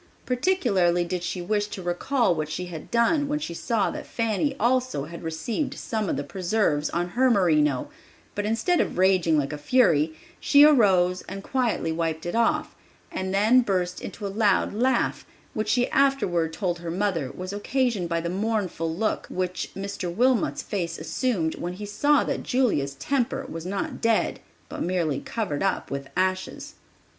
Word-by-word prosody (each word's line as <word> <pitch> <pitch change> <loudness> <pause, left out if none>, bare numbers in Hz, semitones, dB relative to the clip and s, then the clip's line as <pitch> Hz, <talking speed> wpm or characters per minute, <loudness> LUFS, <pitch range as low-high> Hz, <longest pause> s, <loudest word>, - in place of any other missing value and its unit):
Particularly 240 - +2
did 180 0 -3
she 180 0 -3
wish 205 +2 0
to 200 -3 -7
recall 180 +6 +1
what 155 -2 -3
she 170 +4 -3
had 170 -3 -8
done 280 +6 +2
when 295 +1 0
she 300 - -5
saw 220 +5 0
that 300 -1 -7
Fanny 230 +5 -1
also 255 - +1
had 170 +2 -9
received 170 - -3
some 215 -4 -2
of - - -1
the 145 - -2
preserves 175 -3 0
on 175 +1 -2
her 255 +7 +3
merino; 155 - +2 0.5
but 205 - -2
instead 225 +12 +1
of - - -3
raging 185 -4 +3
like 145 0 -1
a 150 - -5
fury, 160 - +3 0.2
she 285 0 +6
arose 190 -11 +5
and 195 +1 -6
quietly 240 -11 0
wiped 160 0 -2
it 175 - -3
off, 230 0 +1 0.4
and 190 0 -3
then 215 +6 +5
burst 185 -5 -1
into 210 - -7
a - - 0
loud 200 -1 +2
laugh, 245 +3 +1 0.3
which 215 -1 -2
she 245 +2 +3
afterward 195 -13 +2
told 175 0 -2
her 170 0 -6
mother 170 -6 -1
was 185 +6 -6
occasioned 210 -3 0
by 170 -1 0
the 170 - -3
mournful 190 -3 -1
look 205 +7 -1
which 185 -1 -3
Mr. 195 -2 -4
Wilmot's 245 +5 +1
face 170 -5 -3
assumed 195 -12 -1
when 175 +1 -3
he 205 +3 -7
saw 285 +8 +2
that - - -2
Julia's 175 - 0
temper 265 - -1
was 165 -6 -6
not 195 +1 -3
dead, 230 -1 +1 0.3
but - - -7
merely 170 -6 0
covered 205 -11 -3
up 195 -1 -1
with 140 0 -4
ashes. 185 0 -1
195 Hz, 170 wpm, -25 LUFS, 170-235 Hz, 0.5 s, she